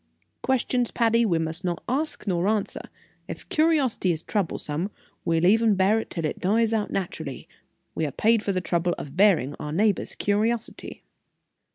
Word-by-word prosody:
Questions, 250 Hz, -2 st, +1 dB
Patty, 230 Hz, 0 st, +2 dB
we 170 Hz, -4 st, +2 dB
must 160 Hz, +2 st, -1 dB
not 175 Hz, -2 st, -2 dB
ask 295 Hz, +5 st, -2 dB
nor 180 Hz, -2 st, 0 dB
answer; 210 Hz, -1 st, -1 dB, 0.5 s
if -, -, -8 dB
curiosity 300 Hz, -, +2 dB
is 160 Hz, -1 st, -3 dB
troublesome, 175 Hz, -3 st, -2 dB, 0.3 s
we'll 165 Hz, 0 st, +1 dB
even 220 Hz, +2 st, +4 dB
bear 195 Hz, +4 st, +3 dB
it -, -, -6 dB
till 165 Hz, -2 st, -3 dB
it -, -, -3 dB
dies 225 Hz, +4 st, +2 dB
out 215 Hz, -2 st, 0 dB
naturally; 160 Hz, -7 st, -4 dB, 0.5 s
we 160 Hz, -, -1 dB
are -, -, -5 dB
paid 225 Hz, -, +2 dB
for 205 Hz, -, -1 dB
the 185 Hz, -1 st, -1 dB
trouble 175 Hz, 0 st, 0 dB
of 140 Hz, -, -8 dB
bearing 180 Hz, -8 st, +4 dB
our 150 Hz, -, -5 dB
neighbor's 200 Hz, +5 st, +1 dB
curiosity." 220 Hz, +3 st, -2 dB
200 Hz, 165 wpm, -25 LUFS, 170-225 Hz, 0.5 s, even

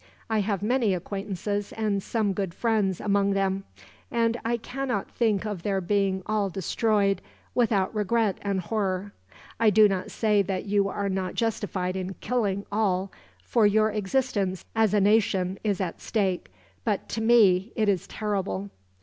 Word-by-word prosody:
I 220 Hz, -, +2 dB
have 200 Hz, -1 st, -1 dB
many 230 Hz, -3 st, +2 dB
acquaintances 200 Hz, +2 st, -3 dB
and 210 Hz, -3 st, 0 dB
some 210 Hz, -1 st, 0 dB
good 190 Hz, -3 st, -3 dB
friends, 215 Hz, -6 st, +1 dB
among 200 Hz, -1 st, +2 dB
them; 195 Hz, 0 st, 0 dB, 0.4 s
and 230 Hz, -1 st, +1 dB
I 235 Hz, +1 st, 0 dB
cannot 255 Hz, +2 st, -3 dB
think 215 Hz, -4 st, +1 dB
of 205 Hz, -5 st, -4 dB
their 195 Hz, +1 st, 0 dB
being 190 Hz, 0 st, 0 dB
all 210 Hz, -2 st, 0 dB
destroyed, 200 Hz, +1 st, +1 dB, 0.3 s
without 220 Hz, -6 st, +2 dB
regret 215 Hz, -1 st, +1 dB
and 200 Hz, -2 st, -1 dB
horror. 195 Hz, 0 st, -2 dB, 0.5 s
I 225 Hz, -1 st, +5 dB
do 210 Hz, +1 st, +6 dB
not 190 Hz, -2 st, -2 dB
say 210 Hz, -2 st, +2 dB
that 190 Hz, 0 st, -2 dB
you 200 Hz, -1 st, +2 dB
are 200 Hz, +1 st, -2 dB
not 190 Hz, -2 st, -2 dB
justified 200 Hz, -5 st, -1 dB
in 190 Hz, 0 st, -4 dB
killing 205 Hz, -5 st, -1 dB
all, 195 Hz, -3 st, 0 dB, 0.3 s
for 220 Hz, -, +3 dB
your 215 Hz, +1 st, +3 dB
existence 205 Hz, -3 st, -1 dB
as 220 Hz, -2 st, +3 dB
a -, -, +5 dB
nation 195 Hz, -2 st, +2 dB
is 205 Hz, -4 st, 0 dB
at 185 Hz, -4 st, -3 dB
stake; 190 Hz, -, -1 dB, 0.3 s
but 205 Hz, -, -1 dB
to 225 Hz, -, -3 dB
me, 220 Hz, -3 st, +4 dB
it 215 Hz, -2 st, +1 dB
is 195 Hz, -4 st, +1 dB
terrible." 200 Hz, -1 st, -3 dB
200 Hz, 160 wpm, -26 LUFS, 190-220 Hz, 0.5 s, do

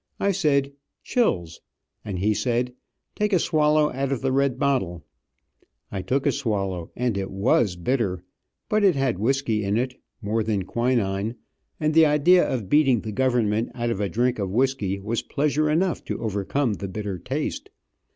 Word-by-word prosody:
I 200 Hz, -, +2 dB
said 140 Hz, -7 st, +1 dB, 0.3 s
"chills," 85 Hz, -, 0 dB, 0.4 s
and 100 Hz, -3 st, -4 dB
he 105 Hz, +4 st, +2 dB
said, 120 Hz, +3 st, -1 dB, 0.4 s
"Take 210 Hz, 0 st, -1 dB
a -, -, +6 dB
swallow 155 Hz, -2 st, +2 dB
out 135 Hz, +1 st, -2 dB
of 135 Hz, -, -1 dB
the 135 Hz, 0 st, 0 dB
red 135 Hz, -1 st, +1 dB
bottle." 125 Hz, -, -1 dB, 0.9 s
I 95 Hz, -, -3 dB
took 135 Hz, +8 st, -1 dB
a -, -, +4 dB
swallow, 95 Hz, -9 st, -2 dB
and 120 Hz, -5 st, -1 dB
it 95 Hz, -, -3 dB
was 95 Hz, 0 st, +2 dB
bitter, 95 Hz, -2 st, -1 dB, 0.4 s
but 215 Hz, 0 st, +1 dB
it 190 Hz, -5 st, +5 dB
had 135 Hz, -8 st, 0 dB
whisky 115 Hz, -2 st, 0 dB
in 100 Hz, +2 st, 0 dB
it, 125 Hz, +1 st, -3 dB, 0.2 s
more 110 Hz, 0 st, -1 dB
than 105 Hz, -3 st, -1 dB
quinine, 115 Hz, -1 st, 0 dB, 0.4 s
and 155 Hz, -1 st, +1 dB
the 160 Hz, 0 st, +6 dB
idea 150 Hz, +5 st, +5 dB
of 115 Hz, -7 st, -2 dB
beating 135 Hz, -5 st, +4 dB
the 110 Hz, -, -5 dB
government 115 Hz, -2 st, +1 dB
out 120 Hz, -1 st, -1 dB
of 105 Hz, -, -2 dB
a 100 Hz, -, 0 dB
drink 120 Hz, +4 st, 0 dB
of 100 Hz, -2 st, -1 dB
whisky 110 Hz, -4 st, 0 dB
was 110 Hz, +4 st, -2 dB
pleasure 150 Hz, +1 st, 0 dB
enough 170 Hz, +3 st, +1 dB
to -, -, -4 dB
overcome 110 Hz, +4 st, -1 dB
the 100 Hz, -, -5 dB
bitter 100 Hz, -1 st, -4 dB
taste. -, -, -4 dB
120 Hz, 170 wpm, -24 LUFS, 100-140 Hz, 0.9 s, a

